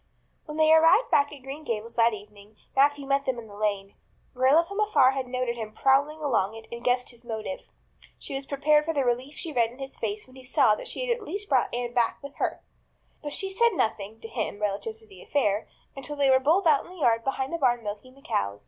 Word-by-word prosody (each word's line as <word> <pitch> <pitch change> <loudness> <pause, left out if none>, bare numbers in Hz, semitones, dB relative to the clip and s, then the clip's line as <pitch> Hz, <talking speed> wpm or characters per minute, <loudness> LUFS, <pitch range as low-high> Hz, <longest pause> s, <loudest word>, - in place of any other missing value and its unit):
When 300 -1 -7
they 315 0 +5
arrived 325 +9 +5
back 285 0 +3
at 285 -3 -12
Green 275 +3 -7
Gables 230 -2 -4
that 230 0 +4
evening 205 0 -11 0.2
Matthew 285 +1 +3
met 275 0 +1
them 260 -2 -1
in 235 - -8
the 205 - -12
lane. 200 -1 -2 0.4
Marilla 265 +6 +4
from 400 +3 -6
afar 345 -12 +4
had 270 -1 -3
noted 250 -1 -2
him 215 -2 -6
prowling 285 +3 +2
along 225 -8 0
it 225 - -10
and 235 0 -7
guessed 250 0 +1
his 240 0 -17
motive. 225 +3 -6 0.5
She - - -8
was 270 0 -4
prepared 300 +2 +3
for 325 0 -2
the 275 -2 +1
relief 250 +4 -1
she 325 -3 -5
read 235 -3 +2
in 245 - -15
his 270 0 -8
face 210 -1 -3
when 255 - -19
he 260 - -11
saw 255 -3 +3
that 210 - -5
she - - -4
had 480 -1 +1
at 470 - -12
least 405 +2 -6
brought 260 -2 +3
back - - -2
Anne 240 -1 -4
back 240 -2 +1
with 280 0 -10
her. - - -2 0.6
But 290 - -5
she 385 -1 -3
said 470 +4 +3
nothing, 220 - -2
to - - -7
him, 220 -3 -3
relative 210 +2 -2
to 220 - -14
the 195 -4 -15
affair, 210 -7 0 0.3
until 275 +2 -6
they 280 -2 +3
were 260 - +6
both 325 +9 +2
out 300 -4 +4
in - - -15
the 370 - -12
yard 230 -7 +2
behind 270 +2 -2
the 335 - -2
barn 240 -4 +2
milking 210 +5 -7
the 275 - -20
cows. 100 +1 -2
260 Hz, 245 wpm, -27 LUFS, 225-290 Hz, 0.6 s, were